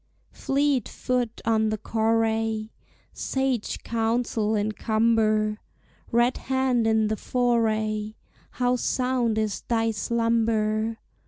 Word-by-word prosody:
Fleet 275 -3 0
foot 245 -2 -2
on 220 -1 +2
the 215 - -1
correi, 225 0 0 0.4
Sage 265 -4 -2
counsel 225 -1 0
in 210 +1 0
cumber, 215 -1 +1 0.5
Red 240 +1 +3
hand 260 -3 +1
in 220 -1 +3
the 215 - 0
foray, 220 -3 0 0.4
How 250 0 +1
sound 250 -3 0
is 215 -2 -1
thy 225 -1 +1
slumber! 225 -1 0
225 Hz, 100 wpm, -25 LUFS, 215-240 Hz, 0.5 s, Red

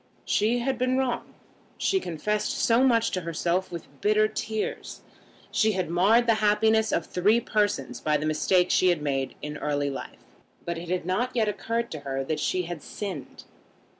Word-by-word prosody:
She 220 +4 +2
had 250 +1 -1
been 255 +1 +1
wrong. 260 -2 -2 0.4
She 385 - +1
confessed 210 - -2
so 235 +2 +3
much 230 -3 +3
to 185 - -2
herself 170 +2 -1
with 170 -1 -7
bitter 215 +1 +4
tears. 215 0 -4 0.5
She 220 0 +2
had 185 -3 -2
marred 205 +7 +4
the 230 - +4
happiness 220 +1 +3
of 165 - 0
three 205 +6 +2
persons 210 -2 -1
by 150 -1 +2
the 150 - -3
mistake 180 +4 +2
she 185 - +4
had 175 -4 +2
made 135 -2 -1
in 150 0 -5
early 145 -1 -1
life. 135 - -8 0.4
But 170 -1 -3
it 170 0 -8
had 180 -2 -1
not 245 +8 -1
yet 225 -3 +2
occurred 230 +3 -2
to 155 - -5
her 135 -1 -3
that 150 +3 -2
she 180 +4 0
had 170 -2 -6
sinned. 190 -6 -7
190 Hz, 180 wpm, -26 LUFS, 165-220 Hz, 0.5 s, bitter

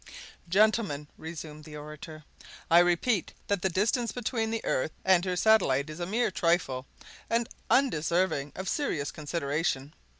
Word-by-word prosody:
"Gentlemen," 195 -7 +2
resumed 155 -2 -8
the 150 -1 -9
orator, 150 +1 -9 0.5
"I 170 - +8
repeat 175 +4 +2
that 200 -3 0
the 190 - +1
distance 215 +5 +1
between 225 -1 -2
the 225 0 -3
earth 130 - 0 0.2
and 185 -2 +5
her 185 -1 -1
satellite 155 -9 +3
is 155 - -9
a 175 - -3
mere 225 +2 +1
trifle, 165 -8 0 0.4
and 230 0 +1 0.2
undeserving 170 - +2
of 190 - -5
serious 165 - -1
consideration. 150 -2 -2
175 Hz, 140 wpm, -29 LUFS, 150-215 Hz, 0.5 s, I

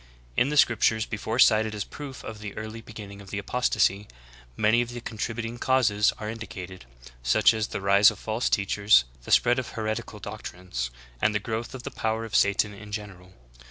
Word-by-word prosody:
2. - - +2
In 130 - +3
the 150 - -1
scriptures 115 -3 +4
before 110 +1 -3
cited 110 -3 +4
as 105 - -2
proof 140 -3 -9
of 110 -1 -7
the 105 -1 -8
early 110 +1 -6
be 115 - -14
ginning 100 -2 -9
of 100 - -13
the 100 - -4
apostasy, 100 -2 +1 0.5
many 110 +3 +4
of 120 - -3
the 120 0 -6
contributing 115 +1 -4
causes 115 -6 +3
are 105 - -6
indicated, 95 - -7 0.4
such - - +4
as 110 -1 -1
the - - -5
rise 100 +1 +6
of - - -7
false 110 +2 -1
teachers, 100 - +4 0.2
the - - -6
spread 120 +2 +5
of 130 - -6
heretical 110 -1 -3
doctrines, 75 -10 -5 0.3
and 110 - +2
the - - +2
growth 115 +4 -4
of 125 - -8
the 140 - -5
power 110 -1 -2
of 110 - -6
Satan 100 +1 +3
in 105 +1 -11
general. 95 -3 -8
110 Hz, 195 wpm, -26 LUFS, 100-115 Hz, 0.5 s, rise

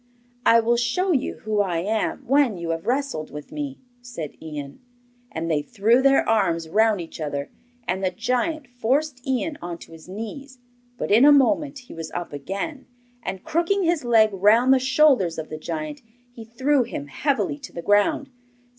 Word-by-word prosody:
'I 230 0 +7
will 235 +1 +2
show 245 +11 +1
you 275 -5 -1
who 215 -1 0
I 185 -4 +1
am 215 +8 -1
when 265 -5 +3
you 170 -1 -3
have 165 +4 -4
wrestled 265 - -1
with 150 0 -9
me,' 285 -2 -5 0.2
said 240 -12 -7
Ian. 145 -3 -7 0.5
And 160 +1 -4
they 150 -2 +2
threw 225 - +2
their 275 0 +4
arms 170 -7 +1
round 215 +3 +3
each 165 -1 -8
other, 145 -1 -3 0.4
and 190 +2 -1
the 185 - +2
giant 255 - -1
forced 255 +3 -1
Ian 270 +4 -1
on 175 -1 -5
to - - -14
his 165 +2 -13
knees; 250 +7 -7 0.4
but - - -3
in 225 +5 +6
a 295 - +8
moment 290 +1 +3
he - - -11
was 165 -1 -6
up 175 -3 -5
again, 195 - -5 0.3
and 190 -3 -5
crooking 345 +5 +1
his 335 -3 +1
leg 225 -3 +4
round 220 +7 +5
the 265 - +4
shoulders 260 - +3
of 160 -1 -5
the 155 - -5
giant, 155 -2 -5 0.3
he 230 -2 -10
threw 260 +5 +1
him 145 -11 -4
heavily 280 - -1
to 280 - -10
the 170 - -7
ground. 205 +8 +2
225 Hz, 180 wpm, -23 LUFS, 170-275 Hz, 0.5 s, a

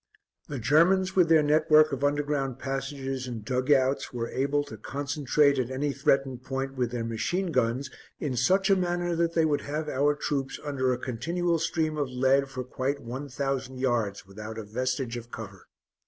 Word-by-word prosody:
The 145 - -4
Germans, 170 - +3
with 180 -3 +4
their 160 -2 +6
network 155 +1 +5
of 135 0 -3
underground 145 -2 0
passages 135 -1 -4
and 115 -4 -6
dug 130 +3 0
outs, 135 -1 +2
were 115 -1 -3
able 140 +2 0
to 110 - -9
concentrate 140 +3 +1
at 125 -1 -1
any 140 +2 -1
threatened 135 -2 +1
point 135 +1 -3
with 125 -3 -1
their 120 -1 -3
machine 165 - -1
guns 130 0 0 0.3
in 140 -4 -2
such 190 - +3
a - - +7
manner 175 -1 0
that 170 0 +1
they 165 -1 +4
would 150 -2 +1
have 150 +2 -3
our 145 +2 +2
troops 140 -2 -2
under 135 -3 0
a 125 - 0
continual 165 +8 -1
stream 160 -1 -1
of 145 -3 -1
lead 135 +2 +2
for 130 -2 -5
quite 135 +2 -2
one 135 +3 -6
thousand 135 -1 -3
yards 120 -7 -1
without 110 +3 -8
a 110 - -4
vestige 125 +3 -2
of 120 0 -9
cover. 100 -5 -9
135 Hz, 185 wpm, -27 LUFS, 125-150 Hz, 0.3 s, a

